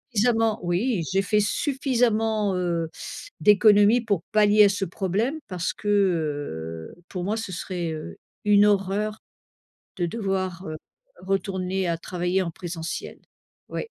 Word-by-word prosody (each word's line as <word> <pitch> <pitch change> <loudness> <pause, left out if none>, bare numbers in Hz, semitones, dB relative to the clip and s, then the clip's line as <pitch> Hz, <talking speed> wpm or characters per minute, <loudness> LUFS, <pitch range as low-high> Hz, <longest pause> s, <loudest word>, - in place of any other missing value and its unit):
suffisamment 225 0 +2
oui 180 +3 0
j'ai 195 +1 +3
fait 210 +1 +2
suffisamment, 225 -5 +1
heu, 170 -3 -1 0.5
d'économies 210 +2 +6
pour 200 -7 -1
pallier 210 0 +6
à - - +5
ce 200 0 -1
problème 200 - -1
parce 180 -2 -2
que, 210 - -9
heu, 145 - -1
pour 180 -2 -4
moi 210 +4 -1
ce 220 -4 -5
serait, 175 -1 -3
heu, 155 -1 -7 0.3
une 205 0 +6
horreur 205 +1 +1 0.8
de 175 - 0
devoir, 190 -2 -2
heu, 155 - -4 0.5
retourner 190 -1 -1
à 170 -1 0
travailler 180 +2 -1
en 180 - -2
présentiel. 170 -1 -6 0.5
Oui. - - -3
195 Hz, 135 wpm, -25 LUFS, 175-210 Hz, 0.8 s, d'économies